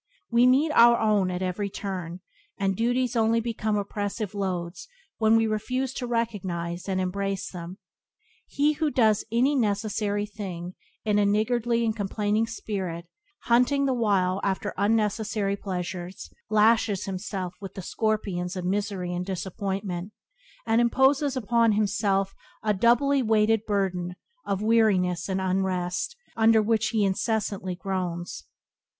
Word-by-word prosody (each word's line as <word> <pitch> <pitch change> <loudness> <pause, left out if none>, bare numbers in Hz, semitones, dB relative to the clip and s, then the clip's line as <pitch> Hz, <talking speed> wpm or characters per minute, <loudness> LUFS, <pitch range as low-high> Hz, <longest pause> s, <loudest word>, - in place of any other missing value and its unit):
We 240 +1 +5
meet 280 +5 +4
our 235 -4 +7
own 210 -4 +2
at 180 +1 -3
every 185 +2 -2
turn, 185 -3 -5 0.4
and 195 -1 0
duties 245 +3 0
only 225 0 +3
become 220 -2 -1
oppressive 205 0 -3
loads 185 - -3 0.3
when 220 0 +4
we 225 - +3
refuse 255 +5 -2
to 250 -2 -4
recognize 190 -7 -3
and 190 -1 0
embrace 195 +1 -2
them. 175 +1 -8 0.7
He 295 +2 +2
who 305 0 0
does 220 -6 +3
any 250 +5 +3
necessary 205 -3 0
thing 185 -4 -7 0.3
in 210 -1 +2
a 205 - +3
niggardly 230 +3 +1
and 220 -1 0
complaining 210 +1 0
spirit, 190 -7 -4 0.4
hunting 250 +4 +3
the 265 - +2
while 195 -5 +1
after 195 -1 -1
unnecessary 210 -1 0
pleasures, 180 -2 -5 0.2
lashes 215 -2 +3
himself 190 -1 -4
with 195 - -8
the 190 - -6
scorpions 195 -4 -1
of 180 -1 -4
misery 195 -2 -2
and 175 0 -2
disappointment, 190 0 -4 0.5
and 225 +1 +3
imposes 265 +3 +3
upon 230 -1 +3
himself 200 -2 +1 0.3
a 215 -1 +2
doubly 245 +7 +3
weighted 220 -1 +2
burden 185 -3 -1 0.3
of 200 +1 -1
weariness 200 -6 +2
and 190 0 0
unrest 185 - -1 0.2
under 225 0 +5
which 220 0 +2
he 220 -2 +1
incessantly 195 -2 -1
groans. 175 - -4
205 Hz, 135 wpm, -26 LUFS, 185-225 Hz, 0.7 s, our